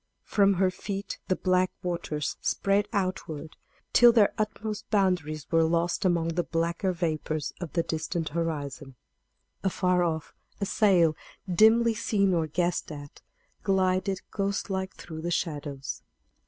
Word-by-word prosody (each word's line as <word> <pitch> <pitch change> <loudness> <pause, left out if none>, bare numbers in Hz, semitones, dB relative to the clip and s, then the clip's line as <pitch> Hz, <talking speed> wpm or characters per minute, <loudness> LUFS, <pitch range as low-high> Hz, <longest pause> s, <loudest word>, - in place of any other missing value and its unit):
From 200 -1 +3
her 185 +1 +2
feet 195 +2 -5
the 185 - +2
black 185 0 +2
waters 170 -4 -2
spread 200 +1 +1
outward, 185 -6 -3 0.4
till 240 -1 +8
their 220 -4 +4
utmost 215 0 -3
boundaries 180 -7 +1
were 165 -1 +4
lost 170 +3 +1
among 170 -2 +2
the 175 +1 0
blacker 170 +3 -1
vapors 155 -3 -2
of 175 - -5
the 170 - +1
distant 160 +1 -2
horizon. 145 -4 -3 0.7
Afar 180 -1 +2
off 160 -2 -2 0.3
a 200 - 0
sail, 180 -7 +4 0.3
dimly 220 +5 +5
seen 205 -3 +1
or 165 -2 +1
guessed 175 +2 -1
at, 145 -1 -9 0.4
glided 190 -1 +1
ghost 200 0 -2
like 190 0 -3
through 160 -2 -8
the 170 - -2
shadows. 145 -5 -3
180 Hz, 135 wpm, -28 LUFS, 160-195 Hz, 0.7 s, till